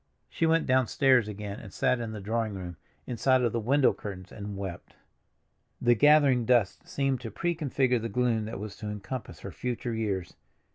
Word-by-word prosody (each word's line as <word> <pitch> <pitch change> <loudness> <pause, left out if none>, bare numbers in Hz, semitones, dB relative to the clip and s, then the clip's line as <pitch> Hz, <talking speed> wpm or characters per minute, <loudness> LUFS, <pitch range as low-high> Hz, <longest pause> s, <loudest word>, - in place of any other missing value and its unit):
She 165 - +1
went 165 0 +3
downstairs 130 -2 +3
again, 105 -1 -6
and 100 - -11
sat 125 - +1
in 115 -2 -4
the 110 - -6
drawing 110 +1 -2
room, 90 -2 -6 0.3
inside 125 +2 +2
of 120 - +2
the 115 - -1
window 135 +5 +3
curtains, 95 -2 -8
and 100 -1 -7
wept. 95 -3 -7 0.8
The 120 0 +4
gathering 140 -1 +5
dusk 120 - +1
seemed 135 -7 -1
to 115 - -5
prefigure 135 - 0
the 115 +1 -4
gloom 115 0 +1
that 110 0 -6
was 105 0 -6
to 105 - -6
encompass 105 +4 -6
her - - -7
future 125 -1 -3
years. 100 -5 -2
115 Hz, 180 wpm, -28 LUFS, 105-130 Hz, 0.8 s, gathering